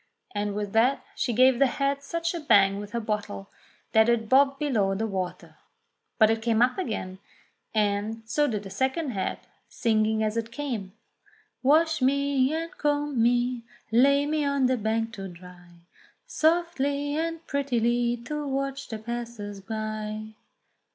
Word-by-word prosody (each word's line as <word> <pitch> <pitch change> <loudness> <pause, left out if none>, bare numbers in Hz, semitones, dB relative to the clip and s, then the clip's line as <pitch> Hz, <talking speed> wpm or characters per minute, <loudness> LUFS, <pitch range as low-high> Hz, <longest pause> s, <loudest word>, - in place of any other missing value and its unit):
'* - - -46
And 205 -1 -2
with 205 -1 -3
that 245 +5 +3
she 245 - -1
gave 255 +2 +4
the 275 - +5
head 275 +2 -1
such 335 +3 -2
a 340 - -3
bang 200 -9 +4
with 205 0 -7
her 235 - 0
bottle 210 -2 -4 0.4
that 220 +1 +5
it 230 -2 +1
bobbed 275 +3 +4
below 220 -10 +1
the 220 +3 -1
water. 190 -4 -5 0.6
But 220 -2 +5
it 225 0 -1
came 225 -1 +1
up 250 +7 +3
again, 190 - -4 0.6
and 210 +1 0
so 295 +7 +1
did 210 -5 -3
a 195 - -8
second 265 - -1
head, 195 -4 -2 0.3
singing 220 -2 +1
as 215 +1 -1
it 230 0 -3
came: 235 -9 -4 0.7
"Wash 315 +3 +3
me, 275 0 +2
and 330 +2 -3
comb 290 -4 0
me, 245 +1 +2 0.3
lay 280 +5 +4
me 305 0 0
on 280 -2 +1
the 255 0 +3
bank 225 +1 -1
to 195 -2 -6
dry 180 0 -13 0.6
Softly 310 - +1
and 330 +1 -3
prettily 240 -3 0
to 300 +1 -3
watch 275 0 -3
the 220 - -5
passers 225 -3 -6
by." 215 0 -5
235 Hz, 160 wpm, -26 LUFS, 215-280 Hz, 0.7 s, the